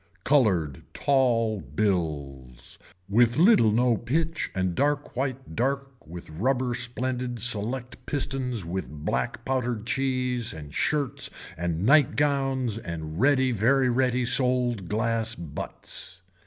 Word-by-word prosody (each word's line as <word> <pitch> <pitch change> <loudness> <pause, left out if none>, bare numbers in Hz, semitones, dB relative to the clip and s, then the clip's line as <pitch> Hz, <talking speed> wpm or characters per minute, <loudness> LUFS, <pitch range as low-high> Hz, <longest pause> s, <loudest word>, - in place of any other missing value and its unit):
Colored 95 - +2
tall 115 -6 +2
bills 70 - -3 0.3
with 120 +4 +3
little 175 - +6
no 120 +2 +3
pitch 160 +7 -1
and 95 -1 0
dark 145 +6 -1
white 130 -7 -3
dark 135 +2 -1 0.2
with 85 +2 -9
rubber 125 +8 0
splendid 125 0 -1
select 120 +2 -1
pistons 130 - -1
with 95 +3 -4
black 75 0 -3
powdered 125 -4 -1
cheese 125 -4 -1
and 75 -2 -10
shirts 140 - 0 0.3
and 85 +2 -2
night 145 +2 +5
gowns 135 -5 0
and 80 -3 -6
ready 130 -2 +4
very 125 +4 +3
ready 125 0 +1
sold 125 -6 +2
glass 115 +1 0
butts. 85 +2 -5
120 Hz, 115 wpm, -26 LUFS, 95-130 Hz, 0.3 s, little